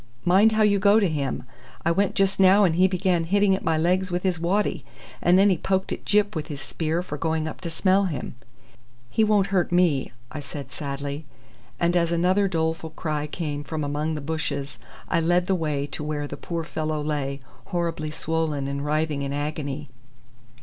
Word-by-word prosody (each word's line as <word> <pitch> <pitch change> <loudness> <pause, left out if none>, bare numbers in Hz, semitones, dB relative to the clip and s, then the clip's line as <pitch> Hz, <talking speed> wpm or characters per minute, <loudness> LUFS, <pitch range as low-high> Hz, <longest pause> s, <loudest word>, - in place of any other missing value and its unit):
Mind 195 +5 +5
how 215 0 +3
you 200 -1 +4
go 200 +3 +5
to 200 - +3
him. 145 -5 -2 0.4
I 170 - +4
went 195 +3 +1
just 195 0 +1
now 195 +2 +6
and 175 -4 +3
he 185 +2 +5
began 185 -2 +1
hitting 200 +2 +3
at - - -6
my 160 -1 +1
legs 180 +4 +1
with 175 0 -2
his 185 -3 0
waddy, 190 +5 0 0.4
and 175 +1 +5
then 200 +1 +5
he 180 - +1
poked 190 0 0
at - - -5
Gyp 210 -1 +2
with 155 -2 -3
his 145 -4 -6
spear 160 +4 -2
for 150 -5 -6
going 160 -1 0
up 155 - -7
to 170 - -4
smell 190 +4 +2
him." 150 -9 -4 0.8
"He 220 - +3
won't 205 -2 +2
hurt 180 -3 +2
me," 175 -6 +2 0.2
I 155 - -5
said 140 0 -8
sadly; 140 +1 -5 0.5
and 170 +1 +2
as 170 -1 +2
another 185 +4 +3
doleful 160 -2 -1
cry 155 -2 -3
came 150 -2 -4
from 155 0 -4
among 150 +2 -1
the 150 - -4
bushes, 140 -4 -3 0.3
I - - +1
led 175 +2 +2
the 190 - +1
way 150 -5 -1
to - - -4
where 150 -1 -2
the - - -6
poor 170 -1 -4
fellow 155 -1 -3
lay, 145 -2 -2 0.3
horribly 170 -4 -2
swollen 155 -2 -2
and 140 0 -3
writhing 150 -1 0
in 140 0 -3
agony. 145 0 -3
165 Hz, 200 wpm, -25 LUFS, 150-185 Hz, 0.8 s, now